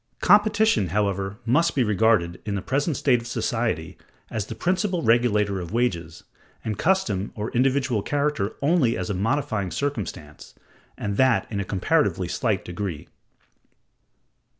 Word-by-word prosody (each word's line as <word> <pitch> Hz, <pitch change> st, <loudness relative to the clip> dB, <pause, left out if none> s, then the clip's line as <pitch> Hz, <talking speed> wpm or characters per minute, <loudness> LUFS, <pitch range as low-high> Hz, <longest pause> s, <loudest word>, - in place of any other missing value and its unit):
Competition, 205 Hz, -, +4 dB
however, 100 Hz, +1 st, -1 dB
must 150 Hz, +9 st, +2 dB
be 130 Hz, -, +3 dB
regarded, 105 Hz, -5 st, +2 dB
in 105 Hz, -1 st, -3 dB
the 100 Hz, -, -2 dB
present 145 Hz, +2 st, 0 dB
state 125 Hz, -4 st, +2 dB
of 115 Hz, -, -9 dB
society, 115 Hz, -, -2 dB, 0.3 s
as 105 Hz, -2 st, -3 dB
the -, -, -6 dB
principal 185 Hz, -1 st, 0 dB
regulator 105 Hz, -4 st, +2 dB
of 85 Hz, +2 st, -7 dB
wages, 85 Hz, -9 st, -1 dB, 0.4 s
and 110 Hz, -1 st, -2 dB
custom 110 Hz, -, +1 dB
or 105 Hz, +1 st, -4 dB
individual 130 Hz, -2 st, +1 dB
character 145 Hz, -6 st, -1 dB
only 145 Hz, -6 st, +3 dB
as 90 Hz, +2 st, -3 dB
a -, -, -1 dB
modifying 110 Hz, -1 st, -1 dB
circumstance, 95 Hz, -, -5 dB, 0.4 s
and 100 Hz, -1 st, -3 dB
that 130 Hz, -3 st, +3 dB
in 100 Hz, -, -2 dB
a -, -, -1 dB
comparatively 95 Hz, -1 st, 0 dB
slight -, -, -1 dB
degree. 90 Hz, -4 st, -5 dB
110 Hz, 140 wpm, -24 LUFS, 100-140 Hz, 0.4 s, Competition